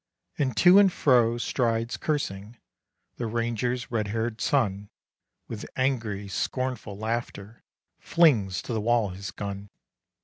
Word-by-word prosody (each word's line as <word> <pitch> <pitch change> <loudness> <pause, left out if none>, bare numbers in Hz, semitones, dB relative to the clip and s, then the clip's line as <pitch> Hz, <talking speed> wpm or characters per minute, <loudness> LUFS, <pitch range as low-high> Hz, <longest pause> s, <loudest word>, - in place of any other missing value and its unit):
And 130 -5 0
to 180 +2 +7
and 200 -2 +5
fro 120 -7 +3
strides, 115 -1 -1
cursing, 115 -7 -3 0.6
The 120 - -3
ranger's 120 +2 -2
red 110 -3 -1
haired 110 +1 -3
son, 105 -7 0 0.6
With 110 -2 -6
angry, 110 -7 -1
scornful 120 +1 -3
laughter 110 -1 -5 0.4
Flings 120 - +3
to 120 - -5
the 110 - -1
wall 115 -1 +2
his 95 +1 -7
gun. 100 0 -6
115 Hz, 125 wpm, -26 LUFS, 105-125 Hz, 0.6 s, to